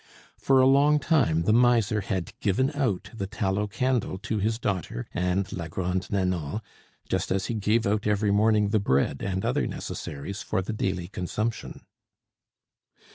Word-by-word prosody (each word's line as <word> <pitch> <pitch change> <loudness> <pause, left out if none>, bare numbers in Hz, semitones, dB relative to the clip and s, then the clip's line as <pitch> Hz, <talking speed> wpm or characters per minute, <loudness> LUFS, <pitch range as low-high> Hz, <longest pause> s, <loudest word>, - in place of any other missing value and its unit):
For 135 -1 +4
a 130 - +6
long 140 +3 +5
time 140 - +2
the 105 - +3
miser 115 -3 +3
had 95 -3 -3
given 130 +8 +1
out 130 - -1
the 100 -4 -4
tallow 100 0 -1
candle 125 -2 -1
to 105 +2 -3
his 110 +3 0
daughter 95 - -3
and 90 +2 -1
la 85 -3 -4
Grande 90 +2 -2
Nanon 90 -3 -1 0.5
just - - -1
as 95 0 0
he - - -2
gave 110 +2 +1
out 105 +1 0
every 105 0 +2
morning 105 0 +3
the 110 +1 +2
bread 70 -6 +1
and 95 -1 -2
other - - +1
necessaries 85 +10 -6
for 95 - -1
the 105 - -4
daily 95 -4 -2
consumption. 105 +5 -4
100 Hz, 160 wpm, -26 LUFS, 95-115 Hz, 0.5 s, a